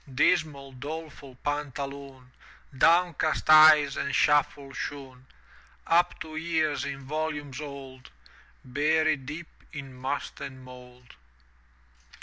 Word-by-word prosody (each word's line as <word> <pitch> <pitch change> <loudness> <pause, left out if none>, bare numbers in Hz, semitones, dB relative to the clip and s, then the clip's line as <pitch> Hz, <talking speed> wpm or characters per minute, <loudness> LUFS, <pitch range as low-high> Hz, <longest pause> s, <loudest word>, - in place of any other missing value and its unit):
Dismal, 140 +1 +1
doleful 145 0 -8
Pantaloon, 140 -2 -5 0.4
Downcast 165 +1 +2
eyes 155 -2 +8
and 140 -2 -2
shuffle 145 -1 +2
shoon, 130 -2 -7 0.6
^^r^.^^lti 165 - +5
Up 175 0 -2
to 155 -1 -7
ears 160 -3 0
in 140 -1 -5
volumes 145 -1 -4
old. 135 -3 -9 0.6
Buried 150 +1 +1
deep 155 +4 -6 0.3
in 140 -4 -8
must 130 +3 -5
and 130 -2 -8
mould. 125 -1 -14
145 Hz, 105 wpm, -27 LUFS, 130-155 Hz, 0.6 s, eyes